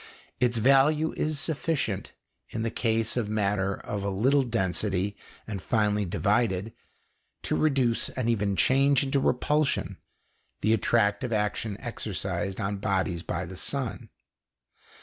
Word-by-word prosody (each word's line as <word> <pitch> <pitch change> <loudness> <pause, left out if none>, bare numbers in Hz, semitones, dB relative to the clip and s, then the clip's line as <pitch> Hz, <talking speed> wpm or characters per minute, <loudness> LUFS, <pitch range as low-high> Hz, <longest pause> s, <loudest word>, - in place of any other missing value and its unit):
Its 120 -1 +2
value 140 +6 +4
is 155 -1 -1
sufficient, 150 - -2 0.4
in 110 - -3
the 115 - -1
case 115 -1 0
of 115 -4 -1
matter 100 -2 0
of 100 -1 -5
little 110 +9 +2
density 100 -4 -1 0.3
and 100 -3 -5
finely 105 -2 +1
divided, 100 +2 0 0.7
to - - 0
reduce 135 -6 +2
and 130 -3 -3
even 105 -4 +1
change 135 +4 +4
into 135 0 +1
repulsion 145 +3 +1 0.6
the 110 +2 +3
attractive 110 +1 +1
action 105 -1 -1
exercised 95 -5 -3
on 100 +1 -2
bodies 95 -4 -1
by 90 +1 -3
the 95 - -9
sun. 115 -2 -3
110 Hz, 125 wpm, -27 LUFS, 100-130 Hz, 0.7 s, value